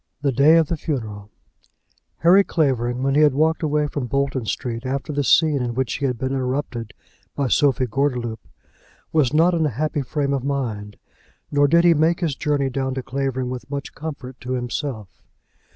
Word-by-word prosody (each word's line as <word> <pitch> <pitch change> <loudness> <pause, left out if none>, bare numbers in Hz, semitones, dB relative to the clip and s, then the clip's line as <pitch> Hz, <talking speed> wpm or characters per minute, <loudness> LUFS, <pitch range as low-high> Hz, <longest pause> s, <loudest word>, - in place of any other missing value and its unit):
THE 140 - +2
DAY 140 +6 +5
OF 165 -2 +3
THE 170 - -1
FUNERAL. 110 -9 -4 0.9
Harry 185 +4 +6
Clavering, 130 -8 0
when 135 0 +1
he 150 +2 +5
walked 155 +3 +2
away 150 -1 +1
from 145 -3 -4
Bolton 135 -1 -1
Street 115 +3 -3
after 135 +3 -3
the 145 0 0
scene 150 0 +3
in 120 -1 -3
which 130 -1 -1
he 140 - -1
had 125 -2 -2
been 130 +3 -2
interrupted 130 -4 -3 0.4
by 140 -3 -1
Sophie 135 -3 +3
Gordeloup, 125 -2 -1 0.7
was 150 -6 +3
not 165 +4 +4
in 160 -2 +2
a - - -1
happy 150 +4 -2
frame 140 +1 -1
of 135 -2 -1
mind, 115 -7 -3 0.5
nor 145 0 +4
did 170 +3 +4
he 175 -1 +6
make 165 +3 +2
his 160 -5 0
journey 145 -2 0
down 130 0 -2
to 130 - -4
Clavering 130 -1 -2
with 130 +1 -7
much 140 0 -5
comfort 140 -4 -8
to 125 +1 -4
himself. 125 -5 -4
135 Hz, 185 wpm, -22 LUFS, 125-150 Hz, 0.9 s, Harry